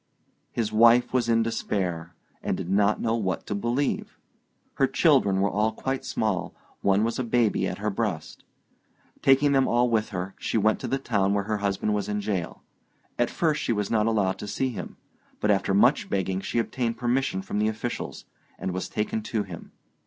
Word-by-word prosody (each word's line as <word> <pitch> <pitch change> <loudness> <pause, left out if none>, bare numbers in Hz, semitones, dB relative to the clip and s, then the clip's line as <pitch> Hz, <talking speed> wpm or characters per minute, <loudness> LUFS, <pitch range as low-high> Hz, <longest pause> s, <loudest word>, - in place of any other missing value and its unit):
His 115 -3 -1
wife 120 +2 +5
was 120 -2 +1
in 115 0 +4
despair, 90 -7 -2 0.3
and - - -1
did 90 - -4
not 100 +1 +3
know 115 0 0
what 95 -5 -2
to - - -3
believe. 120 +7 -1 0.6
Her - - +4
children 95 -1 +3
were 100 - +2
all 105 +2 +1
quite 130 +4 -3
small; 105 -5 -1 0.3
one 100 +1 +3
was 115 +2 -1
a - - 0
baby 120 -2 +1
at - - -4
her 105 +1 -2
breast. 95 -7 -3 0.8
Taking 135 +2 +4
them 135 -1 +3
all 120 0 +2
with 110 -1 +1
her, 95 -1 -4
she - - -1
went 110 +1 +2
to - - -4
the 135 - 0
town 100 -6 +1
where 100 - +1
her 105 +1 -1
husband 100 +1 -1
was 105 -1 -2
in 105 0 -1
jail. 100 -5 -3 0.6
At 120 - +2
first 155 -3 0
she - - 0
was 105 -2 -2
not 110 -1 +2
allowed 105 -4 +1
to 105 - -6
see 130 +6 -1
him; 120 - -7 0.4
but 105 - +2
after 100 -1 +1
much 120 +9 +3
begging, 95 -1 -1
she - - -3
obtained 115 0 -1
permission 120 -5 0
from 100 +2 -3
the 105 - +2
officials, 110 +2 -4 0.3
and 95 - -3
was 95 - -4
taken 110 +1 -2
to 110 0 -2
him. 90 -4 -10
105 Hz, 195 wpm, -26 LUFS, 100-120 Hz, 0.8 s, wife